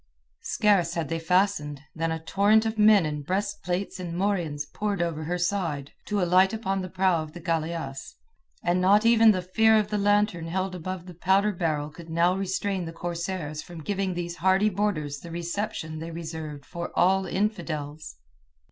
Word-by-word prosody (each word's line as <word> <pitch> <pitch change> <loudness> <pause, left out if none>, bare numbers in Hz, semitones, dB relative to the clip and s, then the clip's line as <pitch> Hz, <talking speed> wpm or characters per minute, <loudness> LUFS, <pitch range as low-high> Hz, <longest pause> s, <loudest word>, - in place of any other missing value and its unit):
Scarce 195 -6 +2
had 165 -4 -2
they 165 0 -1
fastened, 165 -5 +1
than 165 0 -1
a 160 - -1
torrent 210 +5 +3
of 220 0 -2
men 210 -4 +6
in 150 -1 -3
breast 200 +6 -2
plates 180 +2 -3
and 175 -2 -5
morions 175 -7 -1
poured 200 +5 -3
over 165 -3 -2
her 175 +3 -1
side, 175 -6 -1 0.2
to 210 -1 0
alight 185 +2 +4
upon 195 -3 -1
the 185 - -5
prow 185 -2 +2
of 155 -1 -8
the 175 - -8
galeasse, 160 -4 -3 0.5
and 175 +1 +2
not 205 +4 +5
even 225 -1 +6
the 185 -4 +3
fear 220 +4 +4
of 210 -1 +1
the 210 -1 -1
lantern 205 -4 +2
held 185 +2 -2
above 180 0 -5
the 180 - -10
powder 190 +4 +2
barrel 155 -5 -2
could 165 +2 -12
now 170 +3 +2
restrain 190 -1 -2
the 165 - -5
corsairs 170 -2 -4
from 170 -3 -10
giving 195 0 -1
these 175 0 -4
hardy 190 +4 +3
boarders 175 -8 -1
the 170 - -10
reception 170 -2 -4
they 165 +1 -6
reserved 160 -3 -6
for 170 -1 -6
all 190 +1 +3
infidels. 160 - -3
180 Hz, 180 wpm, -26 LUFS, 165-200 Hz, 0.5 s, men